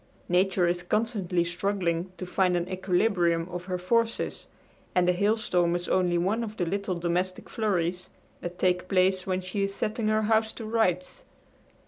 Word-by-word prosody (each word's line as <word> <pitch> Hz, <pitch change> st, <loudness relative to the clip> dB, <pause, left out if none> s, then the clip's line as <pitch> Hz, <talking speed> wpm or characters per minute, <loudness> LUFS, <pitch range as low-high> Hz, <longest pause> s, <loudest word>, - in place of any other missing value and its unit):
Nature 180 Hz, 0 st, +3 dB
is 175 Hz, +1 st, 0 dB
constantly 195 Hz, -3 st, 0 dB
struggling 180 Hz, -1 st, -1 dB
to 185 Hz, -, -5 dB
find 180 Hz, 0 st, +1 dB
an 175 Hz, 0 st, -2 dB
equilibrium 180 Hz, -2 st, +1 dB
of 180 Hz, 0 st, -6 dB
her 180 Hz, -1 st, -2 dB
forces, 230 Hz, +5 st, 0 dB, 0.5 s
and 180 Hz, -1 st, +3 dB
a -, -, +6 dB
hailstorm 185 Hz, -3 st, +1 dB
is 175 Hz, 0 st, -3 dB
only 180 Hz, -2 st, +2 dB
one 200 Hz, +7 st, +1 dB
of 215 Hz, -1 st, -6 dB
the 175 Hz, -, 0 dB
little 195 Hz, +1 st, -2 dB
domestic 175 Hz, +2 st, -2 dB
flurries 180 Hz, -5 st, -1 dB, 0.3 s
that 175 Hz, +1 st, -6 dB
take 180 Hz, 0 st, +1 dB
place 185 Hz, 0 st, +2 dB
when 185 Hz, 0 st, 0 dB
she 185 Hz, +2 st, -3 dB
is 195 Hz, 0 st, -1 dB
setting 215 Hz, +1 st, -1 dB
her 215 Hz, 0 st, +2 dB
house 220 Hz, 0 st, +2 dB
to 225 Hz, -, -7 dB
rights. 215 Hz, -5 st, 0 dB
185 Hz, 165 wpm, -27 LUFS, 175-205 Hz, 0.5 s, a